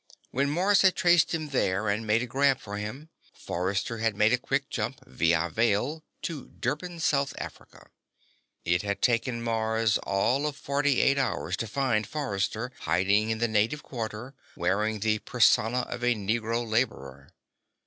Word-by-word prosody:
When 140 +3 +1
Mars 185 +6 +3
had 190 -1 +4
traced 175 -2 +4
him 155 -2 -2
there 105 -6 0
and 105 +2 -1
made 110 +3 +3
a - - -2
grab 135 +2 +2
for 105 0 -7
him, 120 +10 -6 0.3
Forrester 95 +6 -2
had 110 -2 0
made 105 +3 +3
a - - +4
quick 135 +2 -1
jump, - - -3
via 85 +1 +1
Veil, 115 - 0 0.2
to 155 -7 -5
Durban, 165 +7 -3
South 140 -3 +1
Africa. - - -9 0.8
It 85 +1 +2
had 100 -1 -3
taken 120 0 +1
Mars 110 -1 +1
all 120 +9 +1
of 150 - -4
forty 140 -1 +1
eight 140 0 +3
hours 135 - -1
to 115 - -3
find 115 -2 0
Forrester 115 -3 -2
hiding 95 +6 +2
in 110 - 0
the 120 +1 +1
native 110 +7 0
quarter, 115 +1 -6 0.2
wearing 105 +4 0
the 110 0 +1
persona 120 +1 +3
of 120 0 -6
a 120 0 +3
Negro 115 +3 -1
laborer. 70 - -2
115 Hz, 160 wpm, -27 LUFS, 105-135 Hz, 0.8 s, had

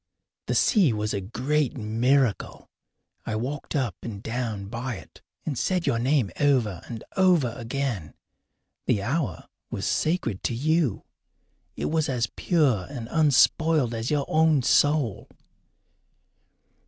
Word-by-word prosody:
The - - 0
sea 190 - +4
was 105 0 -2
a 100 - -2
great 135 +8 -1
miracle. 120 +2 0 0.6
I 110 - -3
walked 135 +8 -4
up 125 - 0
and 105 -3 -7
down 115 -4 -3
by 120 +4 -4
it 95 - -13 0.2
and 150 - -2
said 180 +7 0
your 115 - +1
name 130 -3 +1
over 125 - +2
and 115 -2 -6
over 175 -11 +3
again. 120 - -3 0.7
The 100 - +1
hour 125 - -2 0.2
was - - -4
sacred 155 - 0
to 120 - 0
you. 155 - +1 0.7
It - - -3
was 160 -1 +1
as 120 -3 -1
pure 135 - +1
and 120 -5 -7
unspoiled 155 -2 +3
as 115 +1 -3
your 145 -2 +1
own 155 -4 +3
soul. 135 -5 +2
125 Hz, 130 wpm, -26 LUFS, 115-150 Hz, 0.7 s, sea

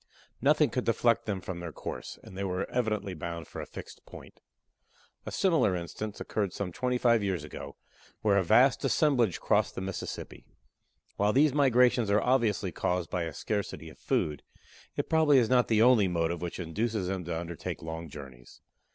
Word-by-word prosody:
Nothing - - +4
could - - -1
deflect - - +2
them 100 -3 -2
from 90 -1 -6
their 85 -1 -6
course, - - -7
and 95 - -12
they 100 - -3
were 95 0 -2
evidently 105 -5 -1
bound 85 0 -6
for - - -7
a - - -7
fixed - - -10
point. - - -13 0.9
A - - -3
similar 165 - +2
instance 100 +4 -5
occurred 100 -4 -2
some 95 -3 -4
twenty 125 +4 -1
five 115 -2 +3
years 95 -6 -1
ago, 75 - -8 0.5
where 100 -2 +4
a - - +1
vast 125 +9 +4
assemblage 125 - +2
crossed - - +1
the - - -4
Mississippi. 95 -1 -6 0.7
While 105 +1 +2
these 145 +1 +4
migrations 125 -5 +4
are 100 +1 +4
obviously 110 -7 +1
caused 90 +1 -2
by 85 -2 -1
a 80 - -4
scarcity 105 -2 -3
of - - -16
food, 75 -2 -1 0.5
it - - -2
probably 155 -3 +4
is 120 -4 +3
not 125 -1 +4
the 110 -1 +4
only 120 -5 +5
motive 85 -1 -1
which 90 +1 -5
induces 105 +4 -2
them 95 -1 -2
to 85 -1 -2
undertake 85 -2 -6
long 80 0 -6
journeys. 65 -4 -12
100 Hz, 180 wpm, -29 LUFS, 85-120 Hz, 0.9 s, only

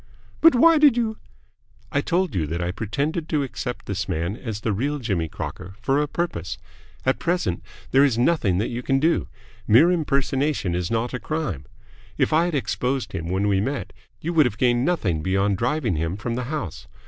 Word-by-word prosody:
"But 330 -5 +7
why 325 +5 +6
did 290 -5 +6
you 220 -2 -1 0.3
?" - - -50 0.3
"I - - +1
told 180 +1 0
you 80 -5 0
that 85 +3 -3
I 90 0 -1
pretended 140 - -2
to 150 -3 +1
accept 125 -2 -5
this 100 0 -3
man 85 +3 -1
as 110 -4 -6
the 110 - 0
real 140 +9 -1
Jimmy 95 - -1
Crocker 95 +4 -7
for 135 +4 +1
a 150 - 0
purpose. 145 - -3 0.5
At 130 - +2
present 170 - 0 0.3
there 135 +1 +6
is 135 -5 +3
nothing 120 - +2
that 105 - 0
you 120 +1 -3
can 135 +2 +1
do. 160 +4 +2 0.4
Mere 130 +12 +6
impersonation 140 - 0
is 90 0 -1
not 115 +2 -1
a 125 - -2
crime. 110 - -3 0.5
If - - +1
I 165 +2 +4
had 175 -3 -1
exposed 130 -3 -1
him 80 - -4
when 95 +3 0
we 100 -1 +2
met, 135 +6 -3 0.3
you 170 +3 -3
would 155 -5 +5
have 110 - -6
gained 120 0 +2
nothing 100 - 0
beyond 95 +3 +1
driving 125 - 0
him 80 +4 -2
from 115 +3 -3
the 125 +1 -2
house. 130 - -5
125 Hz, 200 wpm, -23 LUFS, 95-155 Hz, 0.5 s, But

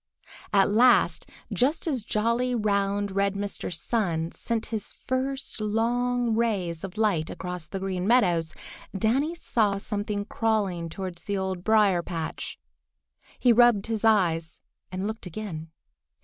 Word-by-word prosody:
At 200 -1 +4
last, 240 +4 +4 0.2
just 275 +6 +1
as 270 -9 -1
jolly, 235 +4 +1
round, 200 -2 0
red 200 0 +1
Mr. 200 -2 -4
Sun 170 -3 -1
sent 230 -1 -3
his 215 -3 -3
first 260 -2 -2
long 235 +2 +1
rays 195 -8 -1
of 195 +1 -7
light 200 -8 +1
across 180 -3 -6
the 195 - -5
Green 190 -1 -2
Meadows, 180 -9 +3 0.4
Danny 270 - +1
saw 215 -11 +1
something 205 0 -3
crawling 200 -7 0
towards 180 0 -6
the 200 -1 -1
Old 190 -2 -3
Briar 210 -5 +4
patch. 165 -2 -5 0.8
He 245 -2 +5
rubbed 235 -4 +5
his 225 -1 -3
eyes 170 -7 +2 0.3
and 185 +1 -3
looked 220 -2 -4
again. 165 -4 -6
205 Hz, 135 wpm, -26 LUFS, 185-230 Hz, 0.8 s, He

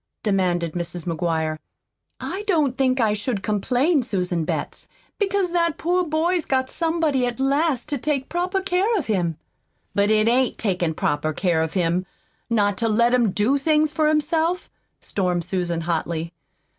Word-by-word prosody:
demanded 180 -5 +1
Mrs. 175 0 -4
McGuire. 160 -2 -1 0.6
"I 390 - -4
don't 305 -9 +2
think 260 -1 +1
I 220 -3 +3
should 210 -1 -2
complain, 250 - +1
Susan 180 -8 -1
Betts, - - -4 0.3
because 395 -3 +1
that 335 -3 +1
poor 360 +2 +1
boy's 335 +2 +1
got 260 -1 0
somebody 320 -6 +1
at 245 +1 -4
last 275 0 +1
to 285 -3 -2
take 275 -1 -1
proper 365 +3 -1
care 390 +4 +1
of 325 - -2
him." 175 -7 0 0.6
"But 200 +1 +2
it 215 0 +3
AIN'T 250 +2 +2
takin' 180 -6 -1
proper 155 +1 0
care 170 -1 +1
of 160 0 -2
him, 180 0 0 0.4
not 205 -4 +1
to 230 - +1
let 235 +3 +3
him 240 -4 +3
do 220 +9 +2
things 305 +1 +2
for 310 0 +1
himself," 320 +3 +1 0.3
stormed 180 -3 -1
Susan 175 -2 -2
hotly. 165 0 -2
235 Hz, 155 wpm, -23 LUFS, -, 0.6 s, I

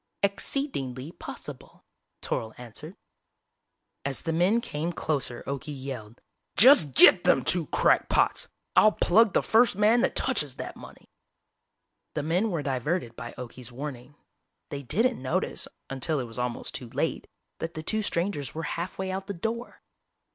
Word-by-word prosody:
_" - - +7
"Exceed 275 +8 -2
ing 130 -2 -3
ly 130 +5 -7
possible," - - -10 0.4
Toryl 110 -1 -3
answered. 125 - -9 1.1
As 140 -1 -1
the 165 - -1
men 180 +8 +3
came 165 -7 -3
closer 140 -7 -2
Okie 140 +1 -5
yelled, 125 -4 -7 0.4
"Just 190 - +7
get 175 - +8
them - - +4
two 175 -4 +2
crackpots! - - +2 0.3
I'll 215 - +6
plug 220 +3 +4
the - - +3
first 230 0 +4
man 215 +4 +4
that - - +1
touches 150 - 0
that - - -6
money!" - - -13 1.1
The 150 - -1
men 180 +8 +1
were 165 -6 -2
diverted 135 -1 -2
by 120 +1 -7
Okie's 125 0 -8
warning. 130 0 -7 0.6
They 140 - -4
didn't 225 - +1
notice, 130 - -1 0.2
until 135 +3 -1
it - - -2
was 115 +1 -8
almost 125 -1 -3
too 125 - -6
late, - - -2 0.3
that 165 +1 -5
the 155 - -5
two 220 +6 +1
strangers 170 -8 -2
were 160 - -3
halfway 185 +2 -4
out 190 +1 -4
the 200 - -4
door. 230 +7 -5
155 Hz, 155 wpm, -27 LUFS, 130-200 Hz, 1.1 s, get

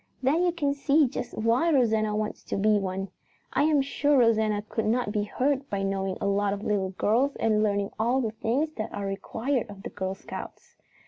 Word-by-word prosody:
Then 290 +6 +3
you 360 -1 +3
can 295 -5 0
see 285 +1 +3
just 245 - -5
why 230 +9 +2
Rosanna 220 -6 +2
wants 215 0 -3
to - - -3
be 210 +1 +3
one. 195 0 -3 0.4
I - - +3
am 300 -3 +3
sure 285 +1 +2
Rosanna 220 -3 +3
could 225 - -2
not 235 -1 +1
be 210 -1 0
hurt 275 +5 -1
by 195 -1 -2
knowing 195 -1 -1
a - - -3
lot 200 0 +1
of 200 0 -5
little 200 -3 0
girls 230 +9 +1
and 215 -1 +2
learning 200 -1 0
all 240 +4 +2
the 225 -4 -1
things 245 +8 -1
that 215 - -3
are 200 - -3
required 225 +5 -2
of 200 -1 -11
the - - -6
Girl 190 -1 -3
Scouts." - - -9
220 Hz, 205 wpm, -27 LUFS, 200-270 Hz, 0.4 s, Then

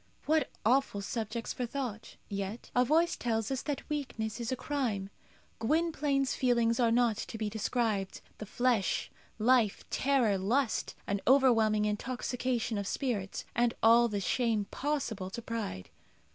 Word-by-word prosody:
What 315 +1 +2 0.2
awful 250 -3 +2
subjects 230 +2 -3
for 245 - -3
thought! 240 -4 -5
Yet 200 +2 -5
a 250 - +5
voice 325 +6 +3
tells 225 -1 -1
us 265 - -1
that 290 -2 -4
weakness 245 -7 -3
is 235 +2 -3
a - - +1
crime. 230 -9 -2 0.5
Gwynplaine's 285 0 +1
feelings 235 -2 +2
are 235 -2 +4
not 230 -2 +3
to 225 - -5
be 215 -1 -2
described. 220 -2 -1 0.2
The 215 - -6
flesh, 240 -3 +1 0.3
life, 225 -2 +2
terror, 250 -8 +2
lust, 230 +6 0
an 200 0 -1
overwhelming 225 -5 +4
intoxication 240 +1 -2
of 200 - -3
spirit, 210 -8 -2
and 240 0 +2
all 235 +1 +7
the 210 -3 -2
shame 220 0 +1
possible 260 -10 -2
to 190 - -6
pride. 215 - -5
235 Hz, 145 wpm, -31 LUFS, 215-260 Hz, 0.5 s, all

